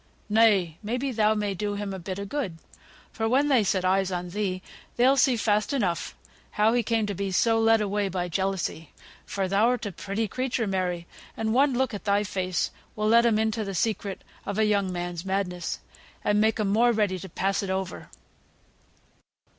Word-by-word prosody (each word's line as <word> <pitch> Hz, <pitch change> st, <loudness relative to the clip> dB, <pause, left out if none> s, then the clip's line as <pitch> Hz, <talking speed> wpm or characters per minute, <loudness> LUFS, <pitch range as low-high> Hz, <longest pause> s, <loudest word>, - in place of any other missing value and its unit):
Nay! 205 Hz, -7 st, +3 dB
may 225 Hz, +3 st, -2 dB
be 270 Hz, +1 st, -2 dB
thou 215 Hz, -2 st, +2 dB
may 205 Hz, -1 st, -1 dB
do 205 Hz, +2 st, -3 dB
him 200 Hz, -1 st, -4 dB
a 190 Hz, -, -5 dB
bit 185 Hz, +2 st, -5 dB
o' 200 Hz, -, -4 dB
good, 200 Hz, -, -3 dB, 0.5 s
for 225 Hz, -1 st, -1 dB
when 280 Hz, +4 st, +3 dB
they 255 Hz, -6 st, +4 dB
set 185 Hz, -1 st, 0 dB
eyes 190 Hz, 0 st, +2 dB
on 180 Hz, 0 st, -3 dB
thee, 185 Hz, -1 st, -2 dB, 0.3 s
they'll 255 Hz, +3 st, +5 dB
see 260 Hz, -2 st, +3 dB
fast 210 Hz, +3 st, +1 dB
enough 180 Hz, -, -1 dB, 0.3 s
how 215 Hz, +2 st, +2 dB
he 245 Hz, -, +3 dB
came 225 Hz, -2 st, 0 dB
to 205 Hz, -, -3 dB
be 195 Hz, +1 st, -3 dB
so 225 Hz, +4 st, +3 dB
led 225 Hz, 0 st, +4 dB
away 205 Hz, -1 st, 0 dB
by 180 Hz, -1 st, -2 dB
jealousy; 185 Hz, -3 st, -2 dB, 0.4 s
for 195 Hz, -1 st, -1 dB
thou'rt 225 Hz, +5 st, +2 dB
a 205 Hz, -, -3 dB
pretty 200 Hz, +5 st, -3 dB
creature, 250 Hz, +1 st, -1 dB
Mary, 180 Hz, -3 st, -1 dB, 0.3 s
and 220 Hz, 0 st, 0 dB
one 270 Hz, +2 st, +4 dB
look 260 Hz, -1 st, 0 dB
at 205 Hz, -, -6 dB
thy 205 Hz, 0 st, +2 dB
face 185 Hz, -2 st, -1 dB, 0.2 s
will 215 Hz, 0 st, 0 dB
let 235 Hz, +1 st, +6 dB
'em 220 Hz, -2 st, +3 dB
into 220 Hz, 0 st, 0 dB
th' 195 Hz, -3 st, -4 dB
secret 205 Hz, -1 st, -2 dB, 0.2 s
of 200 Hz, 0 st, -4 dB
a 220 Hz, -, +3 dB
young 200 Hz, -3 st, +1 dB
man's 175 Hz, -1 st, -4 dB
madness, 190 Hz, -2 st, -2 dB, 0.4 s
and 210 Hz, 0 st, +2 dB
make 220 Hz, +1 st, +2 dB
'em 210 Hz, -2 st, +1 dB
more 235 Hz, +4 st, +4 dB
ready 205 Hz, -4 st, 0 dB
to 190 Hz, -, -8 dB
pass 195 Hz, +4 st, 0 dB
it 195 Hz, -, -4 dB
over." 190 Hz, -1 st, -3 dB
205 Hz, 195 wpm, -26 LUFS, 190-225 Hz, 0.5 s, let